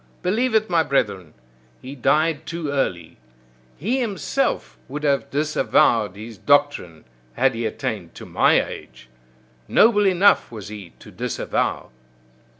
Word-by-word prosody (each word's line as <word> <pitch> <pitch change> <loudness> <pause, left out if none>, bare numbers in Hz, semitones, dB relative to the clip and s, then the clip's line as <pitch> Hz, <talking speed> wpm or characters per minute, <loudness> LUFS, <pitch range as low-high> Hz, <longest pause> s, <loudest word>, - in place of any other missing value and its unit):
Believe 225 +6 +1
it, 220 0 +3
my 170 -2 +2
brethren! 100 - -1 0.4
He 130 +2 -9
died 155 +3 +1
too 165 -3 -4
early; 85 - -2 0.6
he 230 - -1
himself 240 +4 -2
would 150 +3 -6
have 140 -1 +1
disavowed 145 -9 +2
his 110 0 -10
doctrine 145 - +1 0.3
had 135 +1 +2
he 115 0 -2
attained - - -5
to - - -9
my - - +3
age! 65 - -11 0.6
Noble 210 -3 +4
enough 190 -5 +3
was 105 -4 -8
he 105 -5 -10
to - - -14
disavow! - - -2
145 Hz, 130 wpm, -22 LUFS, 110-180 Hz, 0.6 s, Noble